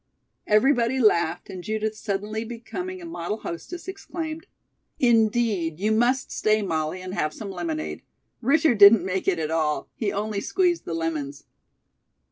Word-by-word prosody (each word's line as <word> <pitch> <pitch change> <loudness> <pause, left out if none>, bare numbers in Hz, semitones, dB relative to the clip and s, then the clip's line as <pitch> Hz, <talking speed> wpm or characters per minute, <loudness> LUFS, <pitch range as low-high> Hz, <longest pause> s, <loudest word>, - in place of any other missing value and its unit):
'" - - -51
Everybody 240 +3 +3
laughed, 175 -7 +2
and 185 -2 -8
Judith 220 +1 -2
suddenly 215 +1 -3
becoming 345 +11 -6
a - - -7
model 210 - -4
hostess, 345 - -7
exclaimed: 330 -4 -6 0.5
"Indeed, 220 - +2
you 210 +3 +1
must 240 +4 +2
stay, 215 0 +1
Molly, 165 0 -2
and 185 0 -6
have 155 -4 -1
some 205 -3 -6
lemonade. 315 - -4 0.4
Richard 280 -1 +3
didn't 200 -2 +8
make 190 0 -2
it 190 -3 +3
at 160 -1 -2
all. 155 -2 0
He 210 -4 -2
only 210 0 -2
squeezed 355 - +1
the 165 - -3
lemons." 155 -4 -3
215 Hz, 150 wpm, -25 LUFS, 180-250 Hz, 0.5 s, didn't